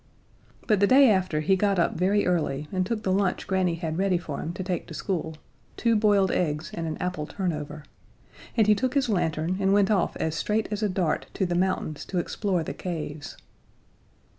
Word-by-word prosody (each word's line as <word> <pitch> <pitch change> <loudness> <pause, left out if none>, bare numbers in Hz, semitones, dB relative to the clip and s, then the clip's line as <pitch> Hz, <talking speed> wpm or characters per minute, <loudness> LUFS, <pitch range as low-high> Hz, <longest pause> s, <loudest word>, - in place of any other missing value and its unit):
But 215 -4 +2
the 200 - +4
day 265 0 +7
after 185 -6 +1
he 190 +5 +3
got 200 0 +1
up 170 - +2
very 195 +4 +2
early 150 -5 0
and 185 -1 0
took 225 -2 -2
the 190 - 0
lunch 190 -1 0
Granny 185 -3 +1
had 165 0 -3
ready 190 -2 +2
for 155 -4 -6
him 160 - -4
to 185 - -5
take 180 -2 -3
to 160 - -8
school 160 -1 -3 0.4
two 230 -1 +2
boiled 205 -3 +3
eggs 155 -2 -1
and 165 -1 -3
an 155 - -3
apple 180 -4 -3
turnover 150 -5 -4 0.7
and 220 - +5
he 210 - +6
took 255 +5 -1
his 275 -4 +2
lantern 170 -2 0
and 195 0 +2
went 200 0 +3
off 195 -4 +1
as 160 - -2
straight 210 +6 0
as 210 0 -2
a 210 - +1
dart 180 -4 -1
to 190 - +1
the 175 - -2
mountains 175 -4 -1
to 185 - -4
explore 180 0 -1
the - - -5
caves. 155 -4 -6
185 Hz, 205 wpm, -26 LUFS, 160-200 Hz, 0.7 s, day